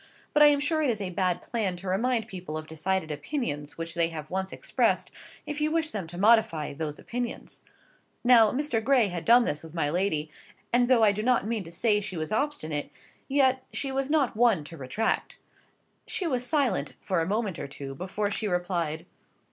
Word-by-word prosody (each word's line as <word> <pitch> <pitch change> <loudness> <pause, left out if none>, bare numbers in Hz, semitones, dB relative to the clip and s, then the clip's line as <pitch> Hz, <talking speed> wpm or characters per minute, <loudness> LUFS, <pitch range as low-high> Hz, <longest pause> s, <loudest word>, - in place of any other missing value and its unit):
But 300 - +4
I 295 - +10
am 290 -1 +4
sure 310 +2 +1
it 295 - +2
is 225 -3 0
a 190 -3 -3
bad 180 0 0
plan 210 -6 -2
to 180 +2 -9
remind 225 +4 +1
people 180 -7 -6
of 155 - -6
decided 160 +2 -2
opinions 150 - -4
which 165 0 -5
they 170 -1 +2
have 155 -2 -7
once 190 0 -2
expressed, - - 0 0.3
if 295 0 -4
you 305 - +2
wish 320 -1 0
them 195 -6 -4
to 175 +2 -9
modify 200 -8 +3
those 150 0 -4
opinions. 240 0 -5 0.6
Now, 240 -3 +7
Mr. 255 -4 -1
Gray 250 -5 +4
had 175 -2 -4
done 240 +1 +6
this 145 - -2
with 160 0 -12
my 150 -3 0
lady; 160 -4 0 0.4
and 245 0 +4
though 245 -3 +5
I 210 - +6
do 205 +1 -3
not 245 -1 +2
mean 220 -2 -2
to 165 - -10
say 210 +4 +2
she 195 -3 -5
was 155 +4 -3
obstinate, 215 - -1 0.4
yet 265 -2 +3
she 275 - -3
was 270 +1 -1
not 290 -7 +2
one 220 -8 +3
to 160 +3 -10
retract. 140 +12 -2 0.7
She 375 - -2
was 250 -6 -1
silent 245 - +1
for 185 -3 0
a 165 - -1
moment 205 -3 -1
or - - -4
two 135 0 -7
before 195 +7 -3
she 215 +1 -1
replied. 175 -4 -1
200 Hz, 205 wpm, -27 LUFS, 165-245 Hz, 0.7 s, I